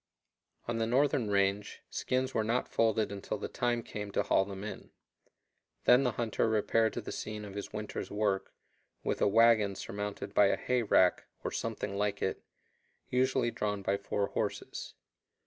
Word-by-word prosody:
On 120 -1 -1
the 115 - +1
northern 130 -2 +2
range, 100 0 0
skins 130 +1 -1
were 110 - +1
not 115 +3 0
folded 110 -2 +1
until 100 -1 -4
the - - -4
time 120 -1 -1
came 105 -2 -6
to - - +2
haul 95 - +3
them 100 0 -7
in. 105 - -7 0.9
Then 125 +2 +6
the 125 -3 +1
hunter 115 -1 0
repaired 110 +1 +2
to - - -3
the - - -7
scene 105 -1 -5
of 100 - -9
his 100 0 -6
winter's 105 -1 -5
work, 105 -2 0 0.5
with - - -1
a - - +5
wagon 110 -2 +5
surmounted 105 +1 -5
by 100 - +6
a - - +2
hay 125 -1 +1
rack 95 -4 +3 0.2
(or - - -2
something 100 - -3
like 105 -1 0
it), 95 - -2 0.7
usually 130 -1 +2
drawn 105 -3 -2
by 100 - +1
four 100 0 -2
horses. - - -4
105 Hz, 170 wpm, -31 LUFS, 100-115 Hz, 0.9 s, Then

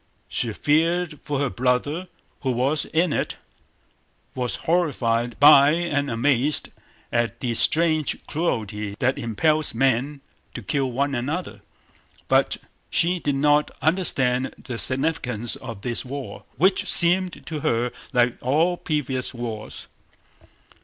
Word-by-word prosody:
She 120 - -2
feared 160 +5 0
for 145 -2 -3
her 140 -1 -1
brother 130 +8 -1 0.3
who 130 -2 -1
was 135 +5 +1
in 165 0 0
it, - - -2 1.0
was 125 -2 -2
horrified 120 -9 0
by 145 0 +7
and 150 -5 -1
amazed 130 +4 +2 0.4
at 115 -1 -1
the 120 -2 -2
strange 155 +6 +3
cruelty 105 -10 -3
that 130 +3 0
impels 150 +5 0
men 135 +3 0 0.3
to - - -6
kill 140 -5 -1
one 140 +3 -1
another, 145 +9 -4 0.7
but - - +2 0.3
she 180 +2 +2
did 145 -4 -1
not 150 +1 +2
understand 135 -7 0
the 120 -3 -6
significance 130 -5 0
of 115 -5 -9
this 120 +1 -3
war, 135 +1 -8
which 185 +6 +2
seemed 180 +1 +4
to 155 -2 -5
her 120 -2 0 0.2
like 125 -1 +2
all 160 +8 +1
previous 135 -6 -3
wars. 115 -3 -6
140 Hz, 125 wpm, -23 LUFS, 120-155 Hz, 1.0 s, by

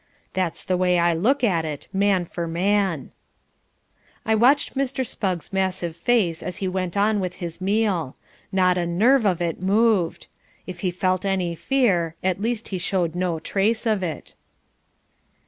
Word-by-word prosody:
That's 185 -3 -2
the 185 - +1
way 180 -1 +2
I 170 0 +3
look 235 +12 +1
at 180 -8 +2
it, 150 -3 -5
man 195 -2 +2
for 170 0 -5
man." 185 -3 0 1.1
I 220 - +2
watched 250 +6 +3
Mr. 265 -1 -1
Spugg's 185 -6 -3
massive 185 -3 -1
face 175 -3 +1
as 180 - -5
he 190 - -2
went 185 0 -2
on 210 +1 +2
with 180 -2 -3
his 170 -1 -7
meal. 195 -7 0 0.4
Not 185 -1 +3
a 175 - -1
nerve 220 +7 +3
of 175 -3 +1
it 170 0 -3
moved. 200 -2 +2 0.4
If 180 -1 -8
he 185 - 0
felt 185 +1 0
any 190 -3 0
fear, 180 -7 +1
at 185 +1 0
least 230 0 -2
he 190 - -3
showed 175 -2 0
no 175 -2 -1
trace 210 +8 0
of 215 -3 +1
it. 165 -4 -5
185 Hz, 165 wpm, -23 LUFS, 175-210 Hz, 1.1 s, I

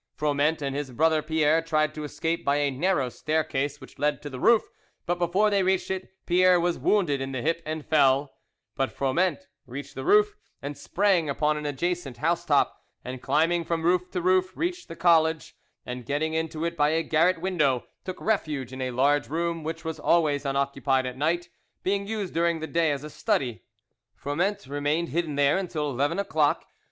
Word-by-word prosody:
Froment 150 +1 +1
and 135 -1 -2
his 145 -1 -3
brother 155 +4 +2
Pierre 160 0 +2
tried 155 -2 0
to 155 - -6
escape 160 +3 -2
by 140 - +2
a 145 -1 +1
narrow 145 0 +1
staircase 145 +1 -2
which - - -14
led 145 -1 +1
to 145 - -6
the 130 - -6
roof, 230 - +5 0.4
but 175 0 -1
before 185 +5 +2
they 200 -1 +3
reached 190 0 +1
it 190 0 -4 0.2
Pierre 180 0 +4
was 175 0 0
wounded 165 -10 +2
in 135 0 -4
the 130 - -2
hip 165 +1 0
and 155 -1 -4
fell; 140 -2 +3 0.4
but 135 -2 -1
Froment 180 - 0 0.2
reached 140 +3 -7
the - - -6
roof, 415 +2 +4 0.3
and 145 +1 -6
sprang 185 -4 +1
upon 150 +2 +1
an 150 0 -4
adjacent 145 -2 -2
housetop, 165 +5 +1 0.2
and 125 0 -6
climbing 170 +4 +2
from 165 0 -2
roof 180 +1 +2
to 180 - -3
roof, 185 0 +2
reached 355 +2 -2
the 165 - -8
college, 160 -2 +2 0.3
and 125 -1 -6
getting 155 +3 -1
into 160 0 -2
it 170 0 -2
by 145 -2 +3
a 160 +1 +1
garret 165 +3 +2
window, 160 -9 +1 0.2
took 185 -1 -6
refuge 150 - -1
in 130 - -6
a 130 - -1
large 140 +4 +2
room 165 +1 -2
which 165 +1 -5
was 160 0 -4
always 150 -4 +2
unoccupied 135 -1 0
at 125 -1 -4
night, 170 +5 -1 0.3
being 200 +1 0
used 210 -4 -3
during 170 0 +1
the 160 - -4
day 165 0 +1
as 140 -1 -3
a 150 - -7
study. 140 - -1 0.5
Froment 180 +8 -2
remained 145 +4 -1
hidden 160 0 -1
there 145 +5 +3
until 155 -6 -2
eleven 140 +6 0
o'clock. 160 -7 +1
160 Hz, 190 wpm, -26 LUFS, 145-175 Hz, 0.5 s, roof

